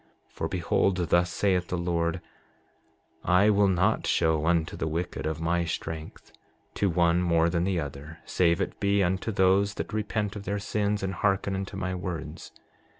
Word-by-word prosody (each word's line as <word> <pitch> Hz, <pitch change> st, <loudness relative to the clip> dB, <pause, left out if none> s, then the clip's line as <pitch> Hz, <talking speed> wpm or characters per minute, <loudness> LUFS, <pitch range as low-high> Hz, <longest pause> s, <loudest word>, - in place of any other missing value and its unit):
7:23 -, -, -33 dB
For -, -, -3 dB
behold, 90 Hz, +1 st, +1 dB
thus 85 Hz, 0 st, +3 dB
saith 90 Hz, -3 st, +1 dB
the 90 Hz, -, -2 dB
Lord: 85 Hz, 0 st, -1 dB, 1.0 s
I 95 Hz, +4 st, +4 dB
will 100 Hz, -1 st, +4 dB
not 90 Hz, -1 st, +1 dB
show 80 Hz, -2 st, +2 dB
unto 85 Hz, -1 st, +1 dB
the 80 Hz, -, -2 dB
wicked 80 Hz, 0 st, -3 dB
of 80 Hz, 0 st, -3 dB
my 85 Hz, +1 st, +1 dB
strength, 80 Hz, -1 st, -6 dB, 0.4 s
to 100 Hz, -, +1 dB
one 85 Hz, 0 st, +2 dB
more 85 Hz, -1 st, +2 dB
than 85 Hz, 0 st, 0 dB
the 95 Hz, -2 st, 0 dB
other, 75 Hz, +2 st, -7 dB
save 85 Hz, -1 st, +2 dB
it -, -, -3 dB
be 100 Hz, 0 st, +2 dB
unto 95 Hz, +5 st, -1 dB
those 100 Hz, +1 st, +3 dB
that -, -, -5 dB
repent 105 Hz, -1 st, -2 dB
of 100 Hz, -1 st, -7 dB
their 100 Hz, +2 st, -1 dB
sins, 105 Hz, 0 st, -1 dB
and 95 Hz, 0 st, -2 dB
hearken 100 Hz, -1 st, 0 dB
unto 95 Hz, 0 st, -5 dB
my 95 Hz, -1 st, -2 dB
words. 85 Hz, -4 st, -6 dB
90 Hz, 175 wpm, -27 LUFS, 85-100 Hz, 1.0 s, I